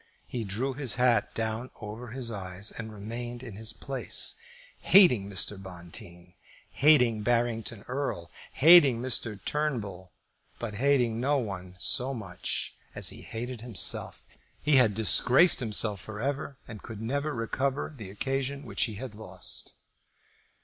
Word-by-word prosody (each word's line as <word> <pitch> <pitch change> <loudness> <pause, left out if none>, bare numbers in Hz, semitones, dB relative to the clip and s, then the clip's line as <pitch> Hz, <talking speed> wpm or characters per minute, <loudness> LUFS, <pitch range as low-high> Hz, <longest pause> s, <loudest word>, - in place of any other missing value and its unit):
He 120 -2 -4
drew 115 +7 -2
his 130 -4 -1
hat 125 -3 +2
down 115 +2 -2
over 110 +3 -7
his 120 0 -5
eyes, 100 0 -5
and 110 -1 -6
remained 120 +4 -6
in 115 -5 -7
his 110 +2 -3
place, 135 +3 +1 0.5
hating 125 - +6
Mr. 100 0 -1
Bonteen, 90 -1 -10 0.4
hating 125 -7 +4
Barrington 115 -1 -1
Erle, 125 -10 -3 0.3
hating 145 -6 +7
Mr. 115 -4 -2
Turnbull, 105 - -2 0.5
but 115 -3 -5
hating 120 -1 +2
no 140 +4 +2
one 95 -7 -5
so 125 +7 +2
much 95 -6 -4 0.2
as - - -1
he - - -9
hated 120 +1 -5
himself. 115 -5 0 0.4
He 150 -1 +3
had 115 -6 +4
disgraced 125 - +5
himself 105 -4 0
for 105 -1 -8
ever 140 +2 -3
and 110 -3 -9
could 110 -1 -8
never 140 +6 -1
recover 135 +6 -2
the 110 -7 -9
occasion 135 +6 -3
which - - 0
he 110 - -6
had 120 +1 -7
lost. 110 +1 -4
115 Hz, 140 wpm, -28 LUFS, 105-130 Hz, 0.5 s, hating